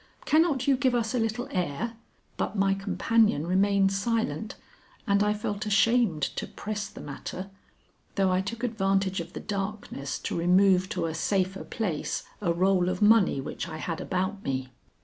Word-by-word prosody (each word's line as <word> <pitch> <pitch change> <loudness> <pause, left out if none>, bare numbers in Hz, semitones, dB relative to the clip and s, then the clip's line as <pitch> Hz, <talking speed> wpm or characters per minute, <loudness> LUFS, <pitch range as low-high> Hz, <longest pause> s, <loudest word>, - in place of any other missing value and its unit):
"Cannot 310 -4 +3
you 275 - +5
give 260 -2 +2
us 230 -1 0
a 250 - +1
little 225 +3 -1
air?" 180 - -2 0.4
But - - -2
my 195 -1 +3
companion 205 -3 +2
remained 195 +2 +3
silent, 220 +1 -1 0.5
and 200 -2 +3
I 210 0 +3
felt 210 0 -3
ashamed 210 - +3
to - - -3
press 210 0 -4
the - - -11
matter 180 +7 -7 0.6
though 195 -2 +2
I 185 0 +2
took 230 +5 -6
advantage 195 -4 +1
of 170 +1 -7
the - - -5
darkness 195 -8 -4
to - - -4
remove 185 +2 +4
to - - -2
a 160 - -2
safer 190 +3 0
place 180 -10 -3 0.2
a 175 -4 +1
roll 180 +1 +2
of 185 +2 -1
money 210 -8 +5
which 135 - -5
I 155 - -6
had 165 +1 -4
about 190 +2 -2
me. 130 -1 -2
195 Hz, 170 wpm, -27 LUFS, 180-220 Hz, 0.6 s, you